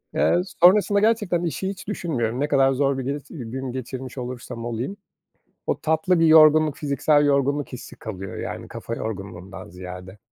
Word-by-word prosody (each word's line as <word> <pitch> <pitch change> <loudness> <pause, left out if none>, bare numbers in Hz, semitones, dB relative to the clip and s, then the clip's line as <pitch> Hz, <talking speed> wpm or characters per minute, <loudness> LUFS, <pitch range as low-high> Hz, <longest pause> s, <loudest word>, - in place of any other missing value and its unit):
Eee, 175 - +3 0.2
sonrasında 200 +2 +6
gerçekten 210 -5 +1
işi 175 +3 -2
hiç 195 -1 -8
düşünmüyorum. 130 - -2
Ne 145 - +1
kadar 135 -2 +4
zor 135 0 +1
bir 135 - -3
giris 140 +2 -3
gün 130 -1 -6
geçirmiş 130 +1 -6
olursam 120 -2 -6
olayım, 120 - -4 0.7
o - - 0
tatlı 160 +3 +1
bir 165 - +5
yorgunluk, 155 -1 +6
fiziksel 145 +1 +2
yorgunluk 140 0 +1
hissi 125 - -9
kalıyor, 95 -3 -7
yani, - - -5
kafa 115 - -6
yorgunluğundan 95 -3 -7
ziyade. 90 +2 -9
135 Hz, 155 wpm, -23 LUFS, 115-160 Hz, 0.7 s, sonrasında